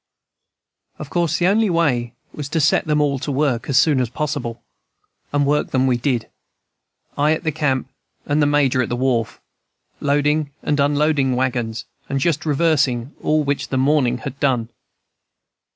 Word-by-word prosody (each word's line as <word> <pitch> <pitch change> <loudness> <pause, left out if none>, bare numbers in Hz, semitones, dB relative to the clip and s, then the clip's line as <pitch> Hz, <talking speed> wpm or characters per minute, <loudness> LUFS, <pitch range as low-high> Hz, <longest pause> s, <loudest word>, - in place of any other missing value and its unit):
Of 150 -2 -9
course 170 -2 +1
the 175 - +1
only 210 +3 +3
way 130 -9 0 0.2
was 145 -2 -6
to 160 - 0
set 150 0 +2
them 150 -1 +2
all 140 -2 +1
at 130 - -7
work 140 -4 0
as 135 - +2
soon 145 -3 +4
as 125 - -1
possible; 120 -4 -4 0.7
and 145 0 +1
work 150 +1 +1
them 130 0 +1
we 130 -2 +2
did, 120 -1 -1 0.9
I 150 +2 +4
at 160 - -4
the 155 - 0
camp 135 -4 -1 0.4
and 150 +1 +1
the 145 - +3
Major 140 -3 +2
at 120 - -2
the 120 - -1
wharf, 120 -3 -1 0.6
loading 145 +1 +1
and 145 -1 0
unloading 145 -2 +2
wagons 120 -3 -2 0.2
and 135 - -1
just 160 +2 0
reversing 145 -4 +1
all 155 0 +1
which 140 0 -2
the 130 - -2
morning 130 -2 +2
had 125 +3 -7
done. 125 -5 0
140 Hz, 170 wpm, -20 LUFS, 130-150 Hz, 0.9 s, soon